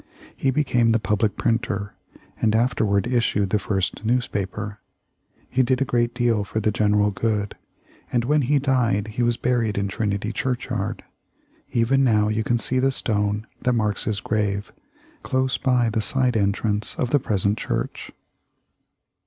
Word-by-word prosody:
He 135 - 0
became 125 -5 +2
the 115 - +3
public 105 +1 0
printer, 105 -3 -1 0.5
and 110 -1 +3
afterward 110 -4 +2
issued 115 -5 +1
the 105 - +2
first 95 -1 -2
newspaper. 105 -3 -2 0.7
He 130 - +1
did 130 0 +2
a 135 - +1
great 120 -1 0
deal 120 -4 +1
for 105 +2 -3
the 110 0 +1
general 105 -1 +2
good, 105 0 -1 0.6
and 120 -1 +1
when 150 +3 +3
he 145 +3 +2
died 120 -7 +1
he 110 +3 -3
was 120 -1 +2
buried 120 -4 0
in 100 0 0
Trinity 105 +1 -2
Church 125 0 -2
yard. 105 -5 -3 0.7
Even 125 +4 +2
now 105 -4 +3
you 110 +1 0
can 120 +2 +1
see 130 +2 0
the 135 +1 +3
stone 105 -3 -1 0.2
that 125 - +1
marks 105 -3 0
his 105 -3 -2
grave, 100 -1 -1 0.5
close 130 -1 0
by 125 -3 +2
the 110 0 0
side 125 +3 +1
entrance 105 +1 0
of 125 - -2
the 145 - +4
present 100 -2 0
church. - - -3
110 Hz, 160 wpm, -23 LUFS, 105-125 Hz, 0.7 s, the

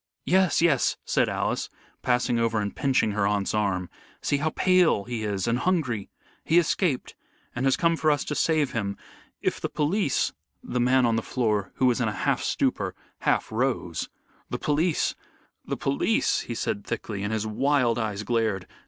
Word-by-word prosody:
"Yes, 185 -2 +3
yes!" 150 -7 +3
said - - +2
Alice, - - -1 0.3
passing 125 -1 +1
over 115 -1 +1
and 100 -1 -3
pinching 130 -5 +2
her 100 -1 +1
aunt's 100 -1 0
arm. 100 -4 0 0.3
"See 145 - 0
how 155 +2 0
pale 180 - +3
he 115 0 -4
is 100 -2 -2
and 120 +1 +1
hungry. 130 - 0 0.3
He 165 - +3
escaped, 170 -4 +1 0.4
and 125 +2 0
has 135 - +3
come 170 -1 +3
for 155 -1 +1
us 145 -2 +2
to - - -3
save 150 -1 +1
him. 100 -4 -2 0.5
If - - -1
the - - -2
police 155 +1 0 0.2
" - - -48
The 125 - +1
man 125 +1 +4
on 115 -1 +2
the - - 0
floor, 105 -6 -1
who 130 - +1
was 125 -1 +3
in 120 - +1
a 105 - -1
half - - +2
stupor, - - 0 0.2
half - - 0
rose. 115 -8 -1 0.4
"The - - -2
police 155 +3 +1 0.5
the - - -2
police!" - - +1
he - - -5
said 100 - -2
thickly, 100 -1 -4
and 105 +1 -2
his 110 -1 -1
wild 120 +1 +1
eyes 105 -2 -2
glared. 110 -5 0
120 Hz, 180 wpm, -26 LUFS, 105-145 Hz, 0.5 s, man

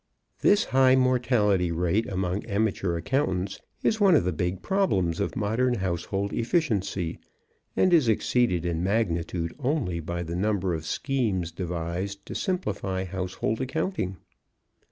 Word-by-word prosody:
This 205 +2 +4
high 130 - +4
mortality 120 -8 +2
rate 90 +6 +1
among 95 +1 -2
amateur 100 -4 0
accountants 95 - -1 0.2
is 220 0 +1
one 195 -4 +6
of - - +4
the 90 - 0
big 90 +3 -2
problems 100 - +1
of 100 - -1
modern 120 +3 +1
household 95 +1 -2
efficiency, 105 - 0 0.6
and 185 - +3
is 155 -8 +5
exceeded 110 -5 +2
in 85 -1 -1
magnitude 85 -4 0
only 130 - -1
by 85 +2 -4
the 85 0 -5
number 95 -1 0
of 80 -1 -4
schemes 105 - -1
devised 90 +3 -4
to - - -7
simplify 100 - -2
household 95 +5 -2
accounting. 130 - -2
100 Hz, 135 wpm, -26 LUFS, 90-125 Hz, 0.6 s, one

